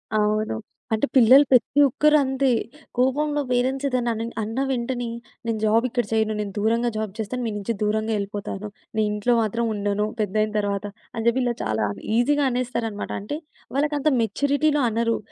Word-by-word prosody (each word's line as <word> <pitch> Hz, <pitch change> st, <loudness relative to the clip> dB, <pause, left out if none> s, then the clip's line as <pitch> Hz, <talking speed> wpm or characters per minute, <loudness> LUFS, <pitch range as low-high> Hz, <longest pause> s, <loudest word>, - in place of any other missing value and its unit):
అవును. 215 Hz, -, +1 dB, 0.4 s
అంటే 220 Hz, +5 st, +2 dB
పిల్లలు 260 Hz, +3 st, +8 dB
ప్రతి 255 Hz, +3 st, +4 dB
ఒక్కరంతే. 275 Hz, -1 st, +3 dB, 0.5 s
కోపంలో 290 Hz, +4 st, +1 dB
పేరెంట్స్ 260 Hz, +3 st, +1 dB
ఏదైనా 245 Hz, -2 st, 0 dB
అనిన్ 230 Hz, +1 st, -4 dB
అన్న 225 Hz, +4 st, -3 dB
వెంటనే 245 Hz, -1 st, -2 dB, 0.4 s
నేను 230 Hz, -1 st, -1 dB
జాబిక్కడ 230 Hz, +2 st, +2 dB
చేయను. 220 Hz, -1 st, +1 dB
నేను 200 Hz, -2 st, -5 dB
దూరంగా 230 Hz, +3 st, +2 dB
జాబ్ 215 Hz, -2 st, -2 dB
జేస్తాను. 240 Hz, +3 st, -3 dB
మీ -, -, -2 dB
నుంచి 205 Hz, +3 st, -2 dB
దూరంగా 215 Hz, +1 st, 0 dB
యెళ్ళిపోతాను. 200 Hz, 0 st, -4 dB, 0.3 s
నేనింట్లో 210 Hz, +2 st, +1 dB
మాత్రం 230 Hz, +2 st, 0 dB
ఉండను, 205 Hz, 0 st, 0 dB, 0.2 s
పెద్దయిన 215 Hz, +1 st, 0 dB
తర్వాత 200 Hz, 0 st, -2 dB, 0.3 s
అని 225 Hz, -1 st, -3 dB
జెప్పి 240 Hz, +3 st, +3 dB
ఇలా 240 Hz, -, +1 dB
చాలా 110 Hz, -1 st, 0 dB, 0.3 s
ఈజీగా 290 Hz, +4 st, +3 dB
అనేస్తారన్నమాట. 235 Hz, -4 st, -3 dB
అంటే 290 Hz, +9 st, -4 dB, 0.4 s
వాళ్ళకంత 295 Hz, +1 st, 0 dB
మెచ్యూరిటీలో 285 Hz, +6 st, +1 dB
అనరు. 230 Hz, +1 st, 0 dB
230 Hz, 145 wpm, -24 LUFS, 215-260 Hz, 0.5 s, పిల్లలు